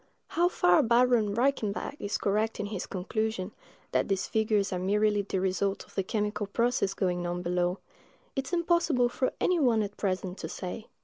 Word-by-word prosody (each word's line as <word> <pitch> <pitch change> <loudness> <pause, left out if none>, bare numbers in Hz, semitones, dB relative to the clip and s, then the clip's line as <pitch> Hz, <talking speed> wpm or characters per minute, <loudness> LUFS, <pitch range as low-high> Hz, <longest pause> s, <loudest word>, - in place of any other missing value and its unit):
How 345 +2 +2
far 180 - +4
Baron 235 -3 +3
Reichenbach 245 -1 0
is 205 - -2
correct 215 +3 0
in 210 - -1
his 205 -3 -4
conclusion, 210 +1 -2 0.4
that - - +1
these 195 -1 0
figures 215 -3 +1
are 180 - -1
merely 205 +2 +2
the 195 -1 -2
result 195 +1 -1
of - - -21
the - - 0
chemical 210 +1 -2
process 230 -2 0
going 180 -3 -1
on 175 0 -3
below, 180 +1 0 0.6
it 270 -1 -2
is - - -9
impossible 340 -7 +2
for 255 +1 -1
any 360 -2 +2
one 235 -6 +3
at 205 0 -6
present 185 -1 -2
to 160 - -5
say. 185 +5 -6
210 Hz, 180 wpm, -29 LUFS, 190-235 Hz, 0.6 s, far